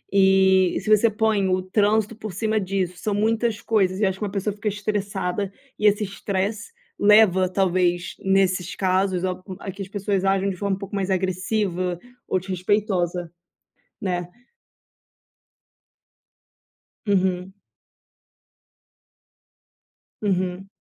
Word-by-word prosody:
E 190 -1 +4
se 195 - -12
você 225 +2 +3
põe 215 -2 +1
o 185 0 +2
trânsito 210 +3 +1
por 215 -2 -7
cima 220 +3 0
disso, 190 -2 -2
são 205 +2 -2
muitas 220 +1 +1
coisas 190 -4 +1
e 210 - +3
acho 190 0 -1
que - - -4
uma 200 - -4
pessoa 200 +1 -2
fica 210 +1 -6
estressada 200 -2 -2 0.3
e 215 - +4
esse 210 +1 +3
estresse 200 - -3 0.3
leva, 205 -3 +5
talvez, 180 -2 +1
nesses 190 -2 +1
casos, 185 -1 +1
o 185 0 -2
hum, 190 - -6
a 195 - -6
que 195 - -10
as 195 - -5
pessoas 200 -1 -1
ajam 195 0 +2
de - - -6
forma 200 +1 -1
um - - -12
pouco 200 0 -6
mais 195 -1 -1
agressiva 185 -1 -1 0.3
ou 185 - +1
desrespeitosa, 185 -2 -1 0.7
né? 180 -3 -2 2.8
Uhum. 190 -1 +1 2.7
Uhum. 185 -1 -1
195 Hz, 125 wpm, -23 LUFS, 185-205 Hz, 2.8 s, leva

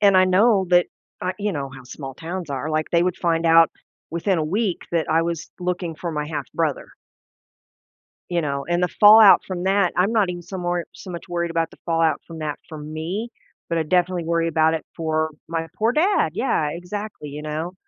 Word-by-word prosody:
and 200 -2 +5
I 185 - +6
know 190 +1 +4
that, 175 0 +5 0.3
I 185 +1 -2
you 205 0 -1
know, 140 -4 -3
how 130 -1 -12
small 135 +1 -8
towns 170 0 -6
are, 140 +2 -3
like 155 0 -1
they 170 0 +3
would 180 -1 -1
find 165 -1 0
out 165 0 +6 0.4
within 170 +2 0
a 155 - 0
week 195 +2 -1
that 165 -2 0
I 165 +1 +3
was 170 -1 -3
looking 180 -2 -2
for 170 +2 -5
my 150 -2 -3
half 155 -1 -5
brother 160 -4 -1 1.4
you 175 -1 0
know, 140 -2 -3
and 175 +1 +1
the 180 - +3
fallout 210 +1 +8
from 180 -2 -4
that 195 -1 +2
I'm 195 +5 +2
not 210 -5 +3
even 175 -1 -5
so 190 +3 -7
more 175 -1 -1
so 185 - -10
much 170 - -7
worried 170 -1 -1
about 165 -1 0
the - - -16
fallout 165 -2 +1
from 165 -1 -9
that 150 -2 -3
for 155 - -7
me, 160 +9 -4 0.4
but 170 - 0
I 160 - +1
definitely 180 +1 +1
worry 165 0 +1
about 160 0 +3
it 160 - -3
for 160 -1 -1 0.2
my 165 0 -3
poor 225 +2 +2
dad. 365 +9 +2
Yeah, 155 - +1
exactly, 180 0 -6
you 150 +1 -7
know. 155 +3 -4
170 Hz, 210 wpm, -22 LUFS, 160-185 Hz, 1.4 s, fallout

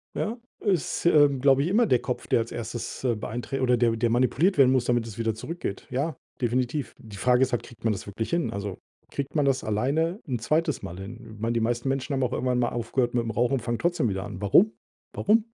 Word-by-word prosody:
ja, 230 +3 -2 0.2
ist, 185 -7 0
äh, 150 -4 +7
glaube 135 0 +3
ich, - - 0
immer 220 +6 +4
der 125 - +3
Kopf, 125 0 -4
der - - +3
als 115 0 -3
erstes, 115 +1 -5
äh, 120 -3 +2
beeinträch 120 +5 -4
oder 125 -1 +3
der 115 -1 +2
der 115 +1 +1
manipuliert 130 - +2
werden 130 -2 +6
muss, 130 -2 +2
damit 120 -2 +1
es 110 -2 -9
wieder 115 -2 0
zurückgeht. 110 - -5
Ja, 140 +6 -1 0.3
definitiv. 125 +3 -1
Die 105 -3 -11
Frage 125 +5 +3
ist 130 0 +3
halt, 120 - -1
kriegt 120 - -15
man 110 -1 +2
das 100 - -7
wirklich 105 +3 -4
hin? 170 -1 0
Also, 100 -1 -4 0.3
kriegt 140 +2 -4
man 145 -2 +3
das 135 -1 +1
alleine 145 - 0
'n 125 -4 -2
2. 155 +6 0
Mal 85 - -6
hin? 115 +3 -9
Ich - - -14
meine, 115 +2 0
die 115 - +1
meisten 120 +3 0
Menschen 135 +1 -1
haben 135 -1 +1
auch 125 - 0
irgendwann 125 -1 0
mal 120 - +2
aufgehört 120 +1 -1
mit 120 -1 +1
dem 115 - -3
Rauchen 120 +3 +1
und 130 - -2
fangen 120 0 -2
trotzdem 175 -9 +1
wieder 95 -1 -2
an. 95 - -7
Warum? 175 - +5 0.4
Warum? 215 +2 +3
125 Hz, 240 wpm, -26 LUFS, 115-140 Hz, 0.4 s, äh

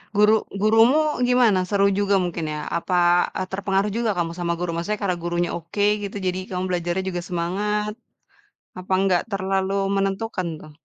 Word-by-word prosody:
Guru 210 +1 +5 0.3
gurumu 225 +7 +5 0.3
gimana? 240 -6 +4
Seru 200 0 +2
juga 200 0 +2
mungkin 170 -2 -3
ya? 150 - -4 0.2
Apa, 180 +2 -2 0.4
eee, 185 - -2
terpengaruh 195 +1 0
juga 235 -2 0
kamu 165 -1 -1
sama 170 -1 -1
guru? 175 0 -3
Maksudnya 170 +6 -2
karena 180 -3 0
gurunya 175 0 -1
oke 175 +5 -3 0.2
gitu, 200 0 -5
jadi 185 0 -1
kamu 185 0 -3
belajarnya 175 +1 -1
juga 175 -1 -3
semangat? 205 +5 -1 0.9
Apa 185 +1 -10
enggak 190 -3 +2
terlalu 195 0 -1 0.2
menentukan 195 -1 -1
tuh? 155 - -13
190 Hz, 160 wpm, -23 LUFS, 175-205 Hz, 0.9 s, Guru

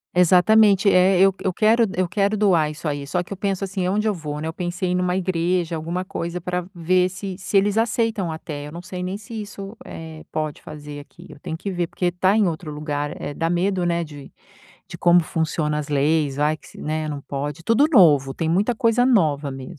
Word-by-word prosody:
Exatamente, 195 +3 +5
é, 185 0 +4
eu 195 +1 +5
eu 190 - +1
quero 225 +5 +3
eu 185 -1 +1
quero 200 +4 0
doar 180 -7 +3
isso 155 +2 -6
aí, 145 -1 -3
só 180 +5 -1
que 190 - -7
eu - - -9
penso 195 0 -2
assim: 190 -1 -2
"Aonde 210 +4 0
eu 215 - +2
vou, 150 -4 -5
né?" 155 - -4
Eu 160 - -4
pensei 180 +1 -2
numa 180 0 0
igreja, 175 -2 0
alguma 170 +3 -3
coisa 170 -1 -4
pra 180 +1 -3
ver 180 +2 +2
se 190 +1 -6
se 200 - 0
eles 205 +2 +2
aceitam 225 -5 0
até, 150 -2 -6
eu - - -9
não 170 +2 -8
sei 180 0 -6
nem 185 +2 -3
se 220 +1 -7
isso, 200 0 -8
eh, 160 -1 -9
pode 155 -1 -3
fazer 150 -1 -9
aqui. 145 - -14
Eu 150 - -13
tenho 160 - -5
que 195 +4 -5
ver, 175 -2 -1
porque 175 +1 -1
tá 185 +4 +2
em 215 - +4
outro 160 -1 -4
lugar, 150 -1 -4
eh, - - -5
dá 165 +3 -1
medo, 180 +1 0
né, 170 0 0
de 145 -3 -11 0.6
de - - -9
como 175 0 +5
funciona 160 -2 -1
as 150 - -4
leis, 145 0 +1
vai 150 +2 +1
que - - -19
se, - - -15
né, 155 0 -2
não 145 -2 -4
pode. 145 +3 -5
Tudo 230 - +4
novo, 145 - +5
tem 165 - -2
muita 200 +8 +1
coisa 230 +2 +2
nova 155 - +2
mesmo, 135 +6 -9
175 Hz, 225 wpm, -22 LUFS, 155-195 Hz, 0.6 s, Exatamente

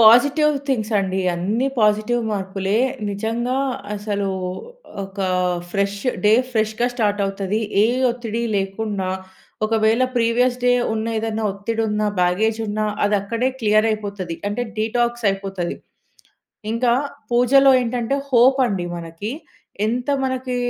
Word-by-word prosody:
Positive 285 +7 +6
things 225 -4 0
అండి. 190 -1 -1
అన్ని 215 +10 0
positive 215 +3 +2
మార్పులే. 195 +1 -1 0.3
నిజంగా 230 +5 -2 0.4
అసలు 200 -1 -2 0.8
ఒక 195 +1 -13 0.5
ఫ్రెష్ 200 0 0 0.3
డే 210 - +6 0.2
ఫ్రెష్‌గా 220 0 0
స్టార్ట్ 205 -3 0
అవుతది. 195 +2 -2 0.2
ఏ - - +5 0.2
ఒత్తిడి 235 -1 -4
లేకుండా, 195 0 -2 0.6
ఒకవేళ 225 +2 +2
ప్రీవియస్ 245 +2 +2
డే 245 - +5 0.2
ఉన్న, 220 +1 -2
ఏదైనా 220 0 -2
ఒత్తిడి 225 +3 -2
ఉన్న, 210 0 -1 0.2
బ్యాగేజ్ 215 +6 +2
ఉన్నా 215 +1 -1 0.2
అది 205 0 +3
అక్కడే 230 +5 0
క్లియర్ 215 +1 +4
అయిపోతది. 200 -5 -4
అంటే 230 +4 -2
డీటాక్స్ 240 +1 0
అయిపోతది. 195 -3 -4 1.0
ఇంకా 235 +1 +2 0.4
పూజలో 265 +3 +5
ఏంటంటే 245 +1 -1 0.2
హోప్ 260 +2 +5
అండి 190 -5 -2
మనకి. 170 +7 -6 0.6
ఎంత 245 +4 -2 0.2
మనకి 260 -1 -2
220 Hz, 120 wpm, -21 LUFS, 200-240 Hz, 1.0 s, Positive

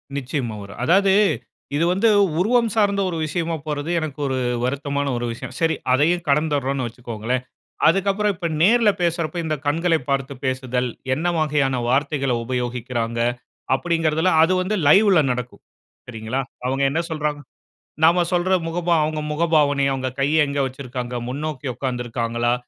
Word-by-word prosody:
நிச்சயமா 130 -4 -3
வரும். 100 +2 -11
அதாவது, 190 +6 +4 0.6
இது 165 +3 +2
வந்து, 220 +4 +3 0.3
உருவம் 230 +4 +3
சார்ந்த 200 -2 +2
ஒரு 165 - -3
விஷயமா 165 +2 -2
போறது, 150 +1 -3
எனக்கு 155 -2 -5
ஒரு 130 -1 -1 0.3
வருத்தமான 140 +2 -1
ஒரு 120 - -3
விஷயம். 115 - -7
சரி. 165 -1 +2 0.2
அதையும் 170 +6 +2
கடந்துர்ரோம்ன்னு 140 -3 +1
வச்சிக்கோங்களேன். 120 +1 -4 0.4
அதுக்கப்புறம், 195 +3 +2
இப்ப 170 -1 -3
நேர்ல 225 +3 +5
பேசுறப்ப, 170 -1 -1
இந்த 155 -1 -1
கண்களை 165 +2 +2
பார்த்து 135 0 -1
பேசுதல், 130 -1 -1 0.3
என்ன 160 +5 -4
வகையான 140 -5 +1
வார்த்தைகளை 135 -1 +1
உபயோகிக்கிறாங்க, 120 -1 -3 0.6
அப்படிங்கறதுல, 165 +2 +1
அது 180 - +3
வந்து 200 +4 -1
லைவ்ல 190 0 +6
நடக்கும். 125 0 -5 0.5
சரிங்களா? 115 +3 -3 0.2
அவுங்க 135 +2 0
என்ன 160 - 0
சொல்றாங்க? 150 -1 -2 0.7
நாம 175 +2 +5
சொல்ற 180 +2 +2
முகபாவ 170 0 +1
அவுங்க 155 0 -2
முகபாவனை, 150 -3 +2
அவுங்க 130 -1 -2
கைய 150 +2 +3
எங்க 140 0 -3
வச்சிருக்காங்க, 125 -2 -6
முன்னோக்கி 145 +1 -4
உக்காந்து 125 0 -3
இருக்காங்களா? 120 0 -1
145 Hz, 140 wpm, -22 LUFS, 130-170 Hz, 0.7 s, லைவ்ல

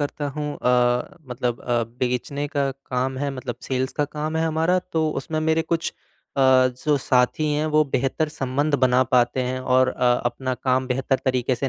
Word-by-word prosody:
करता 145 0 -2
हूँ 150 -1 -2
अ, 125 0 +1
मतलब 120 -1 -2
अ, 120 -1 0 0.2
बेचने 130 +3 -1
का 140 -2 0
काम 130 -1 -3
है, 145 0 -1
मतलब 130 -2 -5
सेल्स 130 0 -2
का 150 - 0
काम 150 +2 -4
है 160 - +1
हमारा, 160 +3 +2
तो 160 -3 -1
उसमें 155 +2 -3
मेरे 160 +1 +2
कुछ 165 0 -2 0.4
अ, 135 - +2 0.5
जो 150 -1 +4
साथी 130 +4 +1
हैं 150 +1 0
वो 155 0 +3
बेहतर 135 +4 0
संबंध 145 +1 -1
बना 125 0 +4
पाते 125 +1 +2
हैं 130 +1 -2
और 130 0 +3
अ, 125 -1 +2
अपना 130 +2 -2
काम 130 +1 0
बेहतर 130 +1 0
तरीके 130 -1 +1
से 135 +2 -2
135 Hz, 185 wpm, -23 LUFS, 125-150 Hz, 0.5 s, जो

